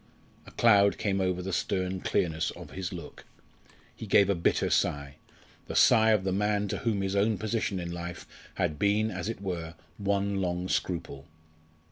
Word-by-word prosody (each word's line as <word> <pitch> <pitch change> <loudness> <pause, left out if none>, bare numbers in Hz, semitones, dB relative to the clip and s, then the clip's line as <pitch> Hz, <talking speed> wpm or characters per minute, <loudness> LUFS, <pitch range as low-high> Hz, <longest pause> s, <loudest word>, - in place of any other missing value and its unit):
A - - -11
cloud 100 -3 +4
came 100 -2 0
over 90 -1 -1
the 95 0 -4
stern 95 +1 -1
clearness 80 -3 0
of - - -10
his 95 -1 -5
look. 85 -2 -9 0.7
He 110 - -8
gave 100 0 +5
a - - +3
bitter 85 -2 +1
sigh 70 0 0 0.5
the - - -5
sigh 110 0 +6
of 105 -3 +3
the 95 - -1
man 105 +1 0
to 105 - -2
whom 110 -4 -1
his 95 0 -2
own 105 +1 +2
position 110 -2 -2
in 85 -1 -5
life 85 0 -6 0.3
had 75 -1 -1
been, 105 +2 +2
as 90 +2 -4
it 115 - -5
were, 85 -4 -4 0.2
one 100 0 0
long 90 0 -2
scruple. 80 -6 -3
95 Hz, 175 wpm, -28 LUFS, 90-100 Hz, 0.7 s, sigh